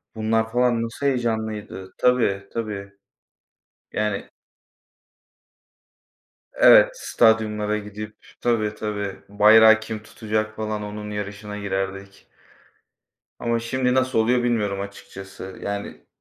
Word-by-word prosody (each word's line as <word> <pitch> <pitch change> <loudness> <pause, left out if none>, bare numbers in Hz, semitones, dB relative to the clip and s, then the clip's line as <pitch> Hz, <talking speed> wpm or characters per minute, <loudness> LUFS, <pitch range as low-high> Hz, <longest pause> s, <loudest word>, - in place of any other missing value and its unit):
Βunlar 110 0 0
falan 120 -1 +2
nasıl 115 +5 -5
heyecanlıydı. 110 -7 -2
Tabii, 100 -6 +2
tabii. 105 -3 -4 1.0
Yani 105 -2 -2 2.2
Evet, - - +7
stadyumlara 105 -2 +2
gidip 105 +1 -8 0.2
Tabii, 110 -3 0
tabii, 105 -2 -4
"Bayrağı 110 +2 +7
kim 110 -1 -6
tutacak?" 110 0 -3
falan 110 -1 -3
onun 105 0 -6
yarışına 105 0 -6
girerdik. 95 0 -4 1.1
Ama 115 0 0
şimdi 125 +2 0
nasıl 130 -2 +1
oluyor 120 +2 +3
bilmiyorum 105 -5 0
açıkçası. 95 -1 -9
Yani 100 0 -5
105 Hz, 95 wpm, -23 LUFS, 105-115 Hz, 2.2 s, Evet